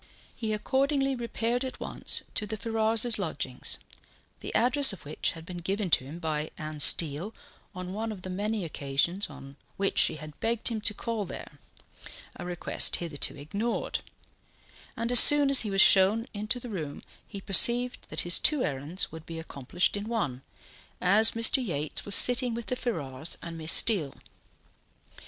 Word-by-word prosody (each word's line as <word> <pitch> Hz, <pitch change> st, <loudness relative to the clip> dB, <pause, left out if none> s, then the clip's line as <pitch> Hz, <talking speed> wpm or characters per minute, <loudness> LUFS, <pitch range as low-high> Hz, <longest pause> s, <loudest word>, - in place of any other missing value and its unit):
He 220 Hz, -2 st, -4 dB
accordingly 270 Hz, +5 st, 0 dB
repaired 235 Hz, +1 st, -2 dB
at 260 Hz, -, -7 dB
once -, -, -4 dB
to 210 Hz, -, +1 dB
the 220 Hz, -, -5 dB
Ferrars's 225 Hz, +1 st, +2 dB
lodgings, 140 Hz, -8 st, -3 dB, 0.6 s
the -, -, -7 dB
address 255 Hz, +2 st, +5 dB
of 175 Hz, -, -12 dB
which 150 Hz, -, -2 dB
had 165 Hz, -1 st, -12 dB
been 180 Hz, +1 st, -8 dB
given 190 Hz, +1 st, -3 dB
to -, -, +3 dB
him 145 Hz, +5 st, -9 dB
by 155 Hz, -2 st, -3 dB
Anne 155 Hz, -1 st, -7 dB
Steele 165 Hz, +7 st, +2 dB, 0.4 s
on 185 Hz, 0 st, -7 dB
one 220 Hz, +2 st, -4 dB
of 190 Hz, -4 st, -10 dB
the 185 Hz, -, -6 dB
many 205 Hz, +1 st, -3 dB
occasions 155 Hz, +6 st, -2 dB
on 135 Hz, +1 st, -13 dB, 0.2 s
which 195 Hz, 0 st, -1 dB
she -, -, +3 dB
had 155 Hz, -1 st, -11 dB
begged 230 Hz, +1 st, 0 dB
him 225 Hz, -2 st, -4 dB
to 210 Hz, 0 st, 0 dB
call 225 Hz, -2 st, -4 dB
there 150 Hz, -4 st, -10 dB, 0.8 s
a -, -, -8 dB
request 175 Hz, -1 st, +2 dB
hitherto 155 Hz, -3 st, -1 dB
ignored; 200 Hz, +11 st, -3 dB, 1.0 s
and 230 Hz, +1 st, -2 dB
as 245 Hz, -, +8 dB
soon 290 Hz, +1 st, +7 dB
as 275 Hz, -, +6 dB
he 215 Hz, -, -4 dB
was 195 Hz, -1 st, +3 dB
shown 200 Hz, +6 st, +5 dB
into 215 Hz, +4 st, -3 dB
the 245 Hz, -, -10 dB
room 155 Hz, -9 st, -6 dB, 0.2 s
he 200 Hz, -, -8 dB
perceived 235 Hz, +6 st, +2 dB
that -, -, -1 dB
his 175 Hz, 0 st, +3 dB
two 300 Hz, -4 st, +1 dB
errands 145 Hz, +7 st, -3 dB
would 160 Hz, 0 st, -11 dB
be 165 Hz, -, -7 dB
accomplished 160 Hz, +3 st, -2 dB
in 205 Hz, +2 st, -6 dB
one, 145 Hz, -, -3 dB, 0.6 s
as 210 Hz, +5 st, +4 dB
Mr. 230 Hz, +3 st, +3 dB
Yates 150 Hz, -8 st, -3 dB
was 205 Hz, -, +3 dB
sitting 245 Hz, -1 st, +2 dB
with 235 Hz, -1 st, -6 dB
the 250 Hz, -, -2 dB
Ferrars 160 Hz, -, -3 dB
and 170 Hz, -1 st, -7 dB
Miss 160 Hz, -1 st, +2 dB
Steele. 180 Hz, -12 st, +4 dB
200 Hz, 170 wpm, -27 LUFS, 160-230 Hz, 1.0 s, as